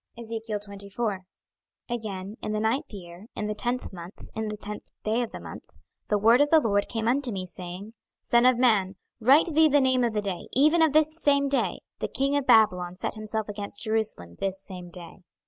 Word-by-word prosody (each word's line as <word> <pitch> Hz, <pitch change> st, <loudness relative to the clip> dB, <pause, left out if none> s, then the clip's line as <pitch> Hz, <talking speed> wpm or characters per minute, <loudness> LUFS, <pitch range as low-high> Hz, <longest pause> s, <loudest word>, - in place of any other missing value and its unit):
26:024:001 210 Hz, -2 st, -4 dB, 0.7 s
Again 210 Hz, -4 st, -5 dB
in 215 Hz, -, -3 dB
the 215 Hz, -, 0 dB
ninth 230 Hz, +8 st, -1 dB
year, 180 Hz, 0 st, -11 dB
in 210 Hz, -, -3 dB
the 210 Hz, -, -2 dB
tenth 240 Hz, +2 st, -1 dB
month, 175 Hz, +1 st, -10 dB
in 220 Hz, 0 st, -3 dB
the 210 Hz, 0 st, -4 dB
tenth 210 Hz, 0 st, -8 dB
day 220 Hz, +3 st, +1 dB
of 235 Hz, -, -3 dB
the -, -, -7 dB
month, -, -, -11 dB, 0.3 s
the 210 Hz, -, +3 dB
word 230 Hz, +5 st, +5 dB
of 290 Hz, -, +3 dB
the 320 Hz, -, +6 dB
LORD 205 Hz, -7 st, 0 dB
came 225 Hz, -1 st, -2 dB
unto 260 Hz, +1 st, +1 dB
me, 190 Hz, -3 st, -4 dB
saying, 185 Hz, +4 st, -8 dB, 0.3 s
26:024:002 -, -, -23 dB
Son 235 Hz, +1 st, +5 dB
of 255 Hz, -1 st, +4 dB
man, 210 Hz, -6 st, +3 dB, 0.2 s
write 285 Hz, +8 st, +5 dB
thee 315 Hz, +1 st, +6 dB
the 290 Hz, 0 st, +4 dB
name 260 Hz, -2 st, +3 dB
of 235 Hz, -2 st, 0 dB
the 210 Hz, -, 0 dB
day, 195 Hz, -3 st, -4 dB
even 305 Hz, +5 st, +4 dB
of 320 Hz, -3 st, +4 dB
this 310 Hz, +1 st, +2 dB
same 280 Hz, -1 st, +3 dB
day: 275 Hz, -1 st, 0 dB, 0.2 s
the -, -, -2 dB
king 275 Hz, +1 st, 0 dB
of 285 Hz, -2 st, -1 dB
Babylon 180 Hz, -5 st, +4 dB
set -, -, -3 dB
himself 215 Hz, 0 st, -4 dB
against 205 Hz, -1 st, -5 dB
Jerusalem 215 Hz, -, -1 dB
this 195 Hz, -1 st, -2 dB
same 180 Hz, -3 st, -9 dB
day. 175 Hz, +1 st, -10 dB
220 Hz, 205 wpm, -26 LUFS, 200-255 Hz, 0.7 s, the